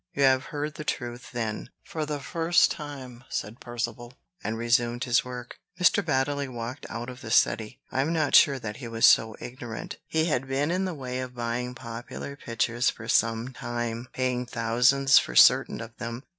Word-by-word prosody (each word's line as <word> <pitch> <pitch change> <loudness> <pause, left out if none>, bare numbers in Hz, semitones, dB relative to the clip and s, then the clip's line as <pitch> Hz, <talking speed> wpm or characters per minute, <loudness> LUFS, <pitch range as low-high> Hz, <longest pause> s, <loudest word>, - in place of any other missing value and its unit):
"You 140 - +2
have 130 -1 +4
heard 150 0 -4
the 155 - -7
truth, 120 -4 -4
then, 115 -3 -3
for 155 -2 -4
the 150 -1 -3
first 165 +5 +3
time," 135 -5 -7
said 110 +3 -4
Percivale, 120 0 -5 0.3
and 110 +1 -2
resumed 120 +1 +1
his 125 -3 +3
work. 125 -1 -8 0.2
Mr. 180 +2 +4
Baddeley 140 -2 0
walked 120 +1 -6
out 120 +1 -5
of 125 0 -9
the 115 - -7
study. 110 0 +2
I 130 - +1
am 150 +4 0
not 160 -2 0
sure 140 -2 +7
that 105 -3 -6
he 125 - -7
was 115 0 +2
so 110 -1 +5
very 120 - -6
ignorant. 120 -3 -7
He 160 0 +1
had 135 -5 0
been 140 +4 0
in 185 +2 0
the 185 -3 -3
way 130 -2 -4
of 125 -1 -6
buying 120 +1 -3
popular 120 +3 -7
pictures 120 -1 0
for 115 - -7
some 115 +2 +1
time, 120 0 -4
paying 125 -1 -1
thousands 125 +5 +4
for - - -5
certain - - +6
of 115 0 -9
them. 115 +2 -5
125 Hz, 190 wpm, -27 LUFS, 115-140 Hz, 0.3 s, sure